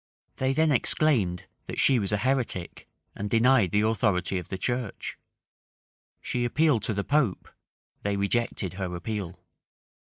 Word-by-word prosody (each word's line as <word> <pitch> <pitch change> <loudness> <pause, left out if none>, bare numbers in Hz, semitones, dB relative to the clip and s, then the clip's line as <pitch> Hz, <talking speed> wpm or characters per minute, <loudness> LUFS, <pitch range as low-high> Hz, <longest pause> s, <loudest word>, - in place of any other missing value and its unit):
They 130 0 +1
then 155 +2 +2
exclaimed, 115 - +2 0.2
that - - -4
she 130 -3 +4
was 100 -2 -2
a 105 - +2
heretic, 120 -6 -2 0.2
and 105 +1 -4
denied 115 -2 +4
the 105 +4 +2
authority 100 -4 +1
of 90 - -10
the 95 - -3
church. 120 +1 -3 1.0
She 125 - -2
appealed 145 0 +2
to 110 - -1
the 100 - -1
pope: 140 -8 +1 0.5
they 100 0 -1
rejected 100 -1 0
her 90 -2 -4
appeal. 95 -1 -5
110 Hz, 140 wpm, -27 LUFS, 95-130 Hz, 1.0 s, she